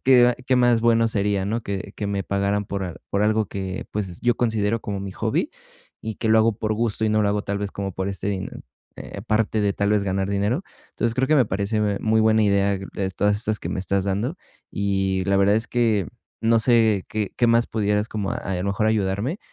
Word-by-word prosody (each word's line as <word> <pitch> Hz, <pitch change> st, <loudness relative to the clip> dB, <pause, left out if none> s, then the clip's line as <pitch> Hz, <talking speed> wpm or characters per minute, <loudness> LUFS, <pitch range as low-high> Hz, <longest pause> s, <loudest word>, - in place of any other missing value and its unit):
que 125 Hz, -2 st, +7 dB
a 125 Hz, -, +1 dB
que 125 Hz, +1 st, 0 dB
más 120 Hz, -2 st, +4 dB
bueno 115 Hz, 0 st, +3 dB
sería, 100 Hz, -3 st, 0 dB
¿no?, 115 Hz, +4 st, -1 dB
que 100 Hz, -1 st, -5 dB
que 105 Hz, -, -3 dB
me 100 Hz, -1 st, -2 dB
pagaran 100 Hz, +1 st, 0 dB
por 100 Hz, 0 st, -4 dB
al 90 Hz, -3 st, -5 dB
por 100 Hz, +1 st, +1 dB
algo 110 Hz, 0 st, +2 dB
que, 95 Hz, -1 st, -5 dB
pues, 95 Hz, -4 st, -4 dB
yo 120 Hz, -1 st, +2 dB
considero 110 Hz, -2 st, 0 dB
como 100 Hz, -1 st, -4 dB
mi 95 Hz, -1 st, -6 dB
hobby -, -, -1 dB, 0.5 s
y 110 Hz, -1 st, -5 dB
que 110 Hz, -, -2 dB
lo 110 Hz, 0 st, +5 dB
hago 110 Hz, -1 st, +3 dB
por 110 Hz, -1 st, -1 dB
gusto 110 Hz, -1 st, -1 dB
y 110 Hz, -, +2 dB
no 110 Hz, 0 st, +2 dB
lo 100 Hz, -, +2 dB
hago 105 Hz, 0 st, 0 dB
tal 100 Hz, 0 st, -3 dB
vez 100 Hz, -1 st, -3 dB
como 100 Hz, -1 st, -4 dB
por 95 Hz, +2 st, -3 dB
este 100 Hz, 0 st, -4 dB
dine 95 Hz, -2 st, -3 dB, 0.5 s
eh, -, -, -9 dB
aparte 110 Hz, 0 st, 0 dB
de 100 Hz, -1 st, +1 dB
tal 100 Hz, +1 st, 0 dB
vez 105 Hz, -1 st, +2 dB
ganar 95 Hz, 0 st, -1 dB
dinero. 100 Hz, -, 0 dB, 0.3 s
Entonces, 115 Hz, 0 st, -1 dB
creo 130 Hz, +1 st, 0 dB
que 155 Hz, -, +4 dB
me 130 Hz, -, +5 dB
parece, 100 Hz, +3 st, -1 dB
me 105 Hz, -1 st, 0 dB
muy 110 Hz, 0 st, +2 dB
buena 110 Hz, 0 st, +4 dB
idea, 100 Hz, -1 st, +2 dB
eh, 95 Hz, 0 st, -4 dB
todas 105 Hz, 0 st, +2 dB
estas 110 Hz, -1 st, +1 dB
que -, -, -5 dB
me -, -, -3 dB
estás 95 Hz, 0 st, 0 dB
dando, 105 Hz, -, -1 dB, 0.4 s
y 95 Hz, -2 st, 0 dB
la 100 Hz, 0 st, +2 dB
verdad 100 Hz, +1 st, +4 dB
es 110 Hz, +1 st, 0 dB
que 110 Hz, -7 st, +1 dB, 0.3 s
no 115 Hz, +1 st, +3 dB
sé 110 Hz, -4 st, +3 dB
qué 105 Hz, -2 st, -3 dB
qué 120 Hz, -, +3 dB
más 115 Hz, 0 st, +3 dB
pudieras 105 Hz, 0 st, 0 dB
como 100 Hz, -2 st, -3 dB
a -, -, -2 dB
a 95 Hz, -, -4 dB
lo 90 Hz, -, -3 dB
mejor 100 Hz, +2 st, 0 dB
ayudarme 110 Hz, -, 0 dB
105 Hz, 240 wpm, -23 LUFS, 100-110 Hz, 0.5 s, que